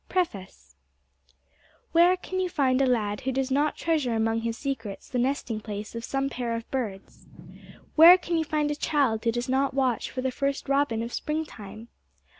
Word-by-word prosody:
PREFACE 190 - -3 1.2
Where 345 +3 +5
can 370 +1 -5
you 370 -1 0
find 270 -6 +2
a 270 - +3
lad 215 -3 0
who 265 0 -1
does 265 0 -1
not 290 +3 +1
treasure 300 -8 0
among 225 0 0
his 230 0 -3
secrets 230 -8 -5
the 250 - -2
nesting 250 -3 -1
place 210 -1 -6
of 230 0 -6
some 270 +3 -1
pair 245 -3 -3
of 230 0 -6
birds? 215 -8 -5 0.7
Where 335 +3 +10
can 345 -1 -3
you 325 - +2
find 300 -1 -1
a - - -1
child 275 -7 0
who 230 - +2
does 240 +2 -3
not 265 +1 +1
watch 260 -4 0
for 255 - -4
the 260 0 -1
first 275 +2 -2
robin 275 -5 +1
of 235 - -6
spring 310 +1 -2
time? 215 -1 -11
260 Hz, 190 wpm, -26 LUFS, 225-295 Hz, 1.2 s, Where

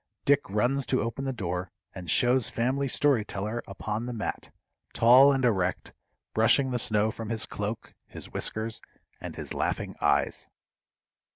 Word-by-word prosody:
Dick 145 -3 +3
runs 125 +7 0
to - - +1
open 115 +4 -4
the 135 - -1
door, 90 -6 -4 0.2
and 90 -3 -8
shows 125 +6 +3
Family 130 +4 0
Story 135 -3 +2
Teller 105 +3 -4
upon 105 +4 -4
the 125 - -4
mat, 110 - -5 0.4
tall 130 +5 +7
and 135 -2 +1
erect, 95 -6 0 0.4
brushing 130 +4 +3
the 125 - 0
snow 110 -1 +2
from 110 0 -7
his 115 -2 +1
cloak, 105 +2 -5
his - - -8
whiskers, 110 +1 -1 0.4
and - - -7
his - - -6
laughing - - -2
eyes. - - +1
115 Hz, 155 wpm, -27 LUFS, 105-130 Hz, 0.4 s, tall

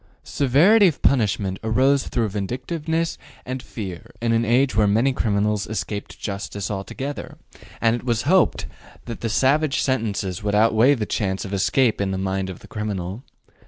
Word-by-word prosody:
Severity 170 - +4
of 160 - -2
punishment 100 -7 +1
arose 130 +5 +2
through 115 -3 -1
vindictiveness 150 - -3 0.3
and 130 +1 -4
fear 95 -9 -7
in 115 0 0
an 115 0 +2
age 125 +4 +2
when 105 -2 +3
many 125 +5 +2
criminals 105 -2 0
escaped 105 0 -5
justice 100 0 -4
altogether, 130 +8 -5 0.4
and 115 0 +3
it - - -10
was 120 -3 0
hoped 180 +2 +3 0.4
that 115 -2 -7
savage 140 +5 +2
sentences 105 -8 -1
would 105 0 -1
outweigh 115 +5 +4
the 110 -4 -2
chance 95 -3 -2
of 100 - -6
escape 110 +4 +2
in 100 - 0
the 95 - -2
mind 95 0 -2
of 90 - -8
the - - -13
criminal. 105 0 -4
110 Hz, 160 wpm, -22 LUFS, 100-130 Hz, 0.4 s, Severity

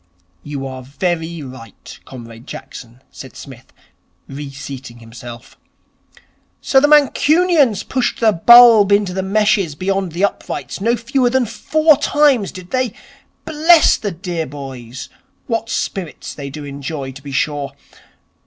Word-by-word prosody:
'You 140 -2 -6
are 130 -1 -7
very 165 +4 -3
right, 125 -5 -12
Comrade 115 -1 -12
Jackson,' 120 +2 -11
said 130 - -12
Psmith, 130 -2 -13 0.6
reseating 135 -3 -9
himself. 120 +1 -12 1.0
'So 270 - +3
the 290 - +3
Mancunians 300 - +3
pushed 255 -2 -2
the 225 -2 +4
bulb 225 +2 +7
into 200 -2 +2
the 190 - -2
meshes 195 -4 +1
beyond 190 +1 -2
the 185 +4 +2
uprights 200 - -5
no 230 +4 +2
fewer 245 +2 0
than 260 0 +1
four 310 +6 +2
times, 290 -7 +2
did 185 -1 -12
they? 255 -4 -1 0.5
Bless 320 +1 +4
the 210 - -4
dear 170 -2 -5
boys, 130 -3 -9 0.4
what 225 -1 -3
spirits 175 -8 -4
they 140 -1 -7
do 145 +1 -8
enjoy, 140 0 -6
to 135 +1 -12
be 140 0 -9
sure. 140 0 -2
175 Hz, 135 wpm, -17 LUFS, -, 1.0 s, bulb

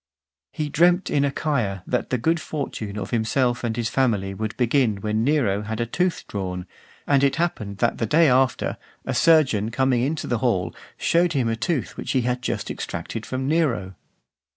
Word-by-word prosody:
He 150 - -3
dreamt 175 +5 +3
in 140 - +2
Achaia 135 - -1
that 125 - -1
the 130 - +1
good 160 +8 +1
fortune 115 -10 -5
of 100 -2 -5
himself 120 +2 +1
and 115 -1 -2
his 115 -1 0
family 110 -7 0
would 110 +2 -4
begin 120 -4 +2
when 110 +1 0
Nero 120 -8 +2
had 110 +1 -4
a 120 - +1
tooth 180 +9 -1
drawn; 90 -3 -4 0.4
and 140 -1 +3
it 135 -1 +3
happened 110 - -2
that 120 +4 0
the 115 - 0
day 160 +6 +5
after, 130 -3 +2 0.3
a - - -2
surgeon 135 -10 +4
coming 125 0 +1
into 145 +5 -1
the 120 - -1
hall, 95 -8 0 0.2
showed 170 0 +2
him 130 -5 +1
a 115 - 0
tooth 135 +4 -2
which - - -3
he 130 - +3
had 125 +1 -1
just - - -3
extracted 115 - -5
from 130 +1 -3
Nero. 140 - +1
125 Hz, 185 wpm, -23 LUFS, 110-145 Hz, 0.4 s, day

